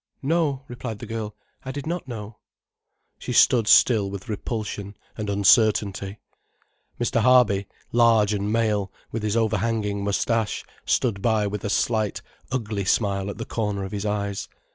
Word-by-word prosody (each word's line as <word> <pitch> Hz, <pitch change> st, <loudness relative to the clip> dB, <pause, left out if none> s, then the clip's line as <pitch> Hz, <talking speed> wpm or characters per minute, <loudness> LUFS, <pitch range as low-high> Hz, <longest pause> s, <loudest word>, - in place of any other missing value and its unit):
"No," 145 Hz, -3 st, +1 dB
replied 120 Hz, -3 st, -6 dB
the -, -, -8 dB
girl, 110 Hz, -2 st, -5 dB, 0.3 s
"I 130 Hz, -, -5 dB
did 140 Hz, 0 st, -6 dB
not 170 Hz, -2 st, -3 dB
know." 110 Hz, -3 st, -7 dB, 0.8 s
She -, -, -4 dB
stood 115 Hz, -4 st, +5 dB
still 105 Hz, -5 st, +5 dB
with 100 Hz, +1 st, -8 dB
repulsion 105 Hz, -2 st, -4 dB, 0.2 s
and 105 Hz, -2 st, -4 dB
uncertainty. 100 Hz, 0 st, +3 dB, 0.8 s
Mr. 120 Hz, 0 st, +1 dB
Harby, 115 Hz, -6 st, +4 dB, 0.2 s
large 115 Hz, -3 st, +4 dB
and 105 Hz, 0 st, -1 dB
male, 105 Hz, -3 st, +1 dB, 0.2 s
with 115 Hz, -, -3 dB
his 105 Hz, +1 st, 0 dB
overhanging 110 Hz, -2 st, 0 dB
moustache, 105 Hz, +2 st, 0 dB, 0.2 s
stood 110 Hz, -6 st, +1 dB
by 110 Hz, -1 st, +2 dB
with 100 Hz, 0 st, -4 dB
a 105 Hz, -, -2 dB
slight, 110 Hz, -1 st, 0 dB, 0.3 s
ugly 110 Hz, -6 st, -2 dB
smile 100 Hz, -1 st, +1 dB
at 100 Hz, -, -6 dB
the 115 Hz, -, -5 dB
corner 105 Hz, -3 st, -2 dB
of 95 Hz, -, -6 dB
his 105 Hz, 0 st, -3 dB
eyes. 100 Hz, -1 st, -2 dB
105 Hz, 150 wpm, -24 LUFS, 100-115 Hz, 0.8 s, stood